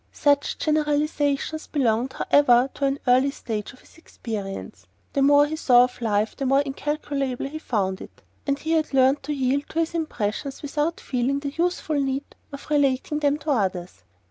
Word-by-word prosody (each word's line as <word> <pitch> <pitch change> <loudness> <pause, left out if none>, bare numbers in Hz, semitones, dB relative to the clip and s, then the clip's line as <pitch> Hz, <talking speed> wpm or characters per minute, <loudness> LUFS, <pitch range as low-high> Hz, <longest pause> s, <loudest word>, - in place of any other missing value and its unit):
Such 285 -1 +1
generalisations 300 0 0
belonged, 255 -2 0
however, 260 -3 +4
to 280 - -2
an 275 0 0
earlier 255 +3 +4
stage 220 -6 -5
of 255 - -19
his - - -20
experience. 195 - -7 0.3
The 275 - +1
more 285 +1 +6
he 305 +2 -3
saw 245 -5 +5
of 250 0 -4
life 215 -1 0
the 270 - -2
more 270 +2 +4
incalculable 275 -2 -3
he 310 +3 -6
found 195 -9 -2
it; - - -13 0.2
and 280 0 +1
he 315 +2 -4
had 315 -3 +1
learned 265 +2 +4
to 290 - -5
yield 275 0 0
to 325 - -2
his 330 0 0
impressions 275 -4 -3
without 295 +3 -1
feeling 265 +2 -1
the 280 -1 -4
youthful 335 -3 0
need 270 +1 -3 0.2
of 280 0 -9
relating 285 0 +1
them 290 -1 +2
to 310 0 -3
others. 185 - -2
275 Hz, 175 wpm, -24 LUFS, 245-295 Hz, 0.3 s, more